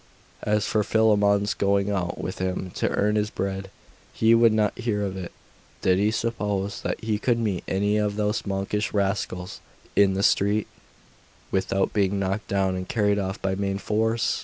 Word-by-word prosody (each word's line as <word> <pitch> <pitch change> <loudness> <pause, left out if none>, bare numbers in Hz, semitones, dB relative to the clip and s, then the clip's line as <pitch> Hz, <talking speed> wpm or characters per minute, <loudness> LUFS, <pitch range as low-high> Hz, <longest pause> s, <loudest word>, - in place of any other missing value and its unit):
As 105 0 +1
for 110 -1 +1
Philammon's 105 -2 +3
going 100 0 +1
out 90 -3 -2
with 95 - -5
him 95 0 -2
to - - 0
earn 105 +1 +1
his 105 0 0
bread, 95 -1 -4 0.4
he 115 +1 +3
would 115 0 +6
not 110 -1 +1
hear 110 -4 -1
of 95 -1 -3
it. 95 -2 -6 0.5
Did 95 0 +3
he 105 +1 +3
suppose 105 -3 -2
that - - -2
he 110 -2 0
could 120 +1 +1
meet 105 -6 -1
any 100 +2 +1
of 105 -1 0
those 105 +1 0
monkish 100 +2 -2
rascals 95 -2 -2 0.4
in 100 -1 +4
the 100 - 0
street, 100 +2 +3 0.9
without 95 0 0
being 100 -1 +1
knocked 100 +2 -2
down 95 -1 +1
and 90 0 -5
carried 105 -3 +2
off 95 -1 -3
by 95 0 +1
main 100 0 -1
force? 110 +3 0
100 Hz, 175 wpm, -25 LUFS, 95-105 Hz, 0.9 s, would